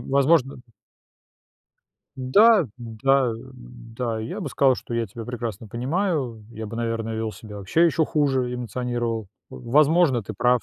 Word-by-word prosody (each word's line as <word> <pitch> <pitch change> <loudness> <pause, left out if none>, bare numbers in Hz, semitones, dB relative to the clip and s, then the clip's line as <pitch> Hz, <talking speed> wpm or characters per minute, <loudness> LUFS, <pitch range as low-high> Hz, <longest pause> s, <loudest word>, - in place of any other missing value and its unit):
возможно 140 0 +3 1.6
Да, 190 - +5
да, 120 +2 +1
да. 120 -2 -7
Я 180 - -5
бы 155 - -3
сказал, 135 -1 +3
что 120 - -7
я 115 -1 0
тебя 115 +3 -9
прекрасно 115 -3 -5
понимаю. 130 - -2
Я 110 -1 -7
бы, 115 - -7
наверное, 115 -1 -2
вёл 110 -1 -2
себя 105 -2 -10
вообще 100 - +2
ещё 160 -1 +2
хуже, 135 -5 0
эмоционировал. 120 -3 -3 0.2
Возможно, 140 - +3
ты 110 - -7
прав. 125 +3 +2
125 Hz, 135 wpm, -24 LUFS, 115-140 Hz, 1.6 s, Да